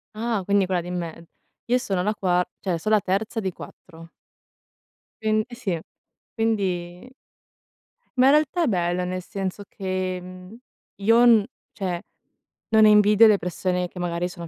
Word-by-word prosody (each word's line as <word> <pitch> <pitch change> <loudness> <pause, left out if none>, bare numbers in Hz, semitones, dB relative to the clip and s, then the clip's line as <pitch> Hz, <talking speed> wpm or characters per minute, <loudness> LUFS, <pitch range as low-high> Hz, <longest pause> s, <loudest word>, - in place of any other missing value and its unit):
Ah, 225 -2 -1
quindi 200 0 +2
quella 180 -2 -1
di 175 - -8
me 170 -2 -6 0.4
io 245 +1 +2
sono 195 -7 -2
la 210 +3 -1
qua 180 -2 +1 0.2
cioè 175 -4 -2
so' 215 - -3
la 215 -1 +5
terza 200 +5 -2
di 190 -3 -2
4. 165 -1 -13 1.1
Quin 215 0 +1
eh 240 - -9
sì. 195 -9 -2 0.6
Quindi 195 -2 -2 1.1
Ma 255 - +5
in - - +7
realtà 310 +3 +2
è - - +1
bello, 180 -3 0
nel 185 0 -3
senso 195 +2 -5
che, 185 -1 -3
mhmm, 185 +4 -11 0.4
io 230 +4 +5
n 225 -4 +6 0.3
cioè, 180 -4 -4 0.7
non 220 -1 +5
invidio 210 +1 +6
le 210 -2 +5
persone 180 0 -2
che 180 - -11
magari 175 0 -2
sono 175 -2 -9
190 Hz, 160 wpm, -24 LUFS, 180-215 Hz, 1.1 s, in